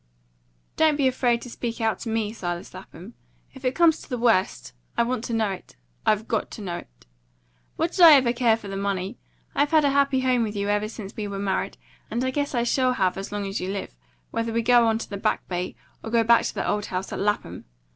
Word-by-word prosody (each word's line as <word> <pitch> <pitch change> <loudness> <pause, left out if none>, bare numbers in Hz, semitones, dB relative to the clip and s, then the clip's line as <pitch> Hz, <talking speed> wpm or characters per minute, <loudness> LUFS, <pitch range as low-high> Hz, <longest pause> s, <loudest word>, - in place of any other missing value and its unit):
"Don't 315 -1 +4
be 280 -2 +2
afraid 245 -2 +1
to 245 - -8
speak 235 -1 -4
out 225 -1 0
to 230 - -5
me, 220 -1 -1
Silas 175 -5 -5
Lapham. 185 +3 -11 0.4
If 265 - -13
it 255 0 0
comes 335 -2 +4
to - - -14
the 250 - -2
worst, 220 - +1 0.2
I - - +4
want 240 -1 -2
to 235 - -4
know 220 -3 +1
it 190 - -9 0.3
I've 215 +1 +2
got 220 - -1
to - - -8
know 175 -3 -3
it. - - -14 0.7
What 330 +1 0
did 370 - -1
I 330 -2 +11
ever 255 -4 +5
care 235 -2 +3
for 210 - -10
the 195 - -5
money? 195 +2 -3 0.3
I've 290 0 +2
had 315 -2 +4
a 280 - +3
happy 275 -1 +2
home 255 -2 +2
with 215 -2 -2
you 200 0 -1
ever 210 +1 0
since 215 -3 -9
we 210 -2 -3
were 200 -1 -5
married, 195 0 -2 0.3
and 235 +3 -1
I 260 - 0
guess 285 0 -2
I 235 - +2
shall 255 +1 +2
have 190 -6 +1
as 195 +1 -6
long 205 -1 -3
as 195 +1 -3
you 185 - -3
live, 195 - -5 0.4
whether 230 0 -2
we 230 +1 0
go 240 0 +5
on 220 0 +2
to - - -6
the 200 - -5
Back - - -1
Bay, 180 -6 -3 0.3
or 225 - -5
go 230 0 +3
back 235 +1 +5
to - - -3
the - - -2
old 210 0 -1
house 185 +1 -4
at - - -4
Lapham. 205 +1 -2
225 Hz, 245 wpm, -25 LUFS, 200-250 Hz, 0.7 s, I